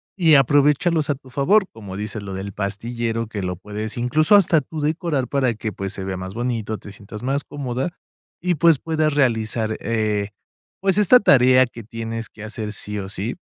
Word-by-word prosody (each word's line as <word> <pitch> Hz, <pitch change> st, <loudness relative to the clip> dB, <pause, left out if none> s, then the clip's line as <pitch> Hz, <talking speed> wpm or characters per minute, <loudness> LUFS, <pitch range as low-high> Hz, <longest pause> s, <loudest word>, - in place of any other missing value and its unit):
y 165 Hz, -5 st, +5 dB
aprovéchalos 145 Hz, +4 st, +3 dB
a 145 Hz, -, +2 dB
tu 130 Hz, -1 st, -17 dB
favor, 190 Hz, +10 st, +3 dB
como 100 Hz, -4 st, -8 dB
dices 105 Hz, 0 st, -4 dB
lo 95 Hz, -1 st, -6 dB
del 100 Hz, +1 st, -6 dB
pastillero, 115 Hz, +3 st, -3 dB
que 105 Hz, -2 st, -5 dB
lo 90 Hz, -1 st, -2 dB
puedes, 105 Hz, +3 st, -5 dB
incluso, 155 Hz, -, +3 dB
hasta 165 Hz, -6 st, +5 dB
tú 155 Hz, +4 st, -8 dB
decorar 155 Hz, -4 st, -1 dB
para 130 Hz, -2 st, +1 dB
que, 110 Hz, 0 st, -4 dB
pues, 95 Hz, +1 st, -5 dB
se 95 Hz, -, -6 dB
vea 95 Hz, -, -3 dB
más 95 Hz, +1 st, -6 dB
bonito, 115 Hz, -3 st, -2 dB
te 100 Hz, -, -11 dB
sientas 105 Hz, +2 st, -10 dB
más 140 Hz, +2 st, 0 dB
cómoda. 135 Hz, 0 st, -3 dB, 0.5 s
Y, 180 Hz, +1 st, 0 dB
pues, 165 Hz, 0 st, +5 dB
puedas 155 Hz, -2 st, 0 dB
realizar, 110 Hz, -4 st, +1 dB
eh, 110 Hz, -3 st, -1 dB, 0.5 s
pues, 195 Hz, 0 st, +1 dB
esta 245 Hz, +5 st, +7 dB
tarea 130 Hz, -6 st, +5 dB
que 115 Hz, -2 st, -11 dB
tienes 115 Hz, 0 st, -5 dB
que 110 Hz, -, -12 dB
hacer 110 Hz, -1 st, -5 dB
sí 105 Hz, 0 st, -5 dB
o 95 Hz, 0 st, -6 dB
sí. 100 Hz, +5 st, -4 dB
120 Hz, 190 wpm, -22 LUFS, 105-145 Hz, 0.5 s, esta